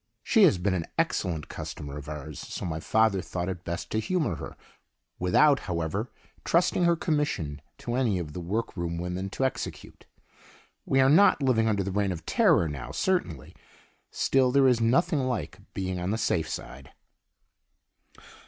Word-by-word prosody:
She 220 -4 +5
has 130 - +4
been 95 +2 0
an 85 -3 -2
excellent 80 -4 -1
customer 70 -1 -7
of 75 0 -8
ours, 75 0 -7
so - - -6
my 80 -2 -3
father 110 +1 +2
thought 90 -1 -4
it 90 -2 -5
best 85 0 -5
to 110 - +1
humor 165 +4 -1
her, - - -8 0.6
without, 135 +11 +4
however, 90 +7 -2 0.3
trusting 175 +1 +2
her 170 0 +4
commission 145 - -1 0.2
to 120 - -5
any 120 -6 +1
of 80 -4 -5
the 90 - -5
workroom 85 -3 -3
women 90 +2 -3
to 130 - -1
execute. 130 - -5 0.8
We 135 - +3
are 130 - +5
not 150 0 +5
living 115 -4 +3
under 100 -3 +1
the 95 - -3
Reign 100 0 0
of 85 -2 -6
Terror 170 - +3
now, 75 -4 -6
certainly; - - -1 0.6
still 130 -1 +2
there 135 0 +5
is 125 -2 +3
nothing 150 +8 +2
like 125 -7 -3 0.2
being 95 -1 -2
on 90 +1 -2
the 110 - 0
safe 85 -7 0
side. 65 +1 -8
100 Hz, 165 wpm, -27 LUFS, 85-130 Hz, 0.8 s, She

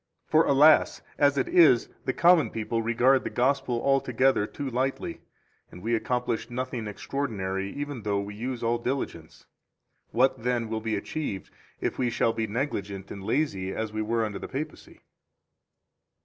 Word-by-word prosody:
4 155 - +4
For, - - -1
alas! 145 +3 +5 0.2
as 145 -1 +4
it 130 - +1
is, 155 -9 +5 0.2
the - - +1
common 170 -3 +4
people 115 +1 -2
regard 120 +4 +3
the - - -3
Gospel 130 -1 +1
altogether 135 -4 +2
too 145 - -6
lightly, 130 +1 -2 0.5
and 90 - -12
we 115 +2 0
accomplish 120 0 -1
nothing 125 -2 -4
extraordinary 100 -5 -3
even 145 -4 -5
though 100 -1 0
we 100 +1 -5
use 120 +3 -4
all 115 +1 +1
diligence. 120 - -4 0.6
What, 125 +1 +2
then, 120 -1 -1
will 110 0 -2
be 110 -1 -1
achieved 100 - -4 0.3
if - - -2
we 125 -2 +2
shall 115 0 +1
be 115 -1 -2
negligent 100 -5 -3
and 100 - -7
lazy 100 -6 -1
as 110 -1 -3
we 110 - -2
were 115 +1 0
under 105 -2 -5
the - - -6
Papacy? 150 +3 -7
120 Hz, 165 wpm, -27 LUFS, 110-135 Hz, 0.6 s, alas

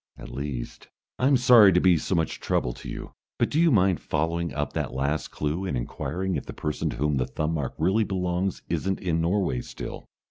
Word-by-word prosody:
At - - -9
least. 70 -4 -5 0.3
I'm 135 +1 +4
sorry 120 -5 +7
to 90 - +5
be 90 -1 +5
so 85 +4 -1
much 80 -2 -1
trouble 60 - 0
to - - -9
you, - - -7 0.3
but - - +1
do 155 - +1
you 170 - +5
mind 95 - +3
following 85 +2 -1
up 75 -2 -3
that - - -3
last 70 +2 -1
clue 75 +5 -2
and 75 -9 -2
inquiring 90 +9 -3
if - - -7
the - - -6
person 75 -2 -2
to - - -4
whom 75 +1 +1
the 65 - 0
thumb 75 +1 -2
mark 75 -5 -3
really 95 +7 +2
belongs 90 -1 -2
isn't 95 0 -1
in 85 -3 0
Norway 85 -7 +1
still?" - - -8
85 Hz, 210 wpm, -26 LUFS, 75-95 Hz, 0.3 s, sorry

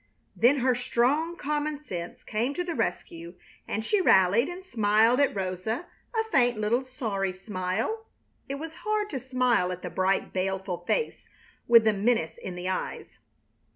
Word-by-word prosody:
Then 255 +3 +4
her 255 0 +3
strong 260 +7 +1
common 300 0 -2
sense 175 -9 -6
came 235 +6 -1
to 355 - -1
the 350 -1 -3
rescue 170 - -3 0.3
and 220 +1 -2
she 410 - +2
rallied 200 - +5
and 365 +1 -8
smiled 225 - +3
at 280 -5 +3
Rosa 195 - -2 0.3
a 445 0 -2
faint 245 - +3
little 230 +5 +1
sorry 205 -7 -2
smile. 190 - -3 0.4
It 275 - -2
was 320 +3 -7
hard 425 0 -1
to 265 - -2
smile 250 -7 +1
at 180 0 -6
the 180 - -5
bright, 190 +2 0
baleful 190 -1 -2
face 465 - -1 0.4
with 230 -1 +8
the 220 -1 +3
menace 205 -5 0
in 185 - -6
the 180 +1 -5
eyes. 185 - -4
230 Hz, 160 wpm, -27 LUFS, 190-285 Hz, 0.4 s, with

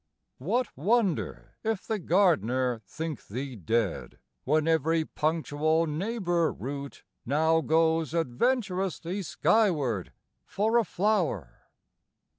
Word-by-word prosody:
What 225 - -1
wonder 200 - 0
if 220 -3 -2
the 220 -1 -2
gardener 130 - +2
think 160 -4 -6
thee 130 +4 -5
dead, 105 0 -1 0.3
When 155 +3 +2
every 160 0 +2
punctual 155 +1 0
neighbor 175 0 0
root 140 +1 -7 0.2
now 160 +5 +2
goes 160 -1 +2
Adventurously 190 - -1
skyward 155 - +1 0.3
for 220 - +1
a - - +2
flower? 175 - -1
160 Hz, 95 wpm, -28 LUFS, 140-195 Hz, 0.3 s, gardener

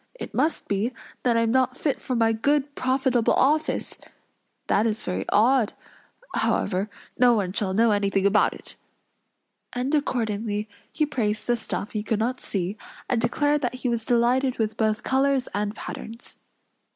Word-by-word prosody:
"It - - -7
must 320 - 0
be, 205 +5 0 0.3
that 240 -2 +2
I - - +3
am 230 -1 +1
not 260 0 +2
fit 290 - -1
for 255 - -2
my 225 -1 +3
good, 285 +5 +1
profitable 255 -3 +1
office! 300 +4 +1 0.7
That 215 +3 +2
is 220 -1 -2
very 95 +1 -3
odd; 235 0 +3 0.6
however, 195 +2 0 0.3
no 245 -1 +6
one 190 -4 -1
shall 190 -2 0
know 230 +1 +4
anything 200 -1 +1
about 205 +1 +3
it." - - -11 1.0
And 255 +4 -2
accordingly 220 -7 -1 0.2
he 310 - +1
praised 215 -7 -2
the 240 - +2
stuff 220 -2 -4
he 215 - -2
could 215 +1 -1
not 245 +4 -1
see, 195 +1 -3 0.3
and 245 -3 +1
declared 290 +5 +1
that 250 -2 -1
he 255 0 -2
was 235 -1 0
delighted 245 +3 +2
with 220 -1 -1
both 215 -1 0
colors 270 -1 +2
and 205 +1 -2
patterns. 230 +1 -8
230 Hz, 165 wpm, -25 LUFS, 210-260 Hz, 1.0 s, no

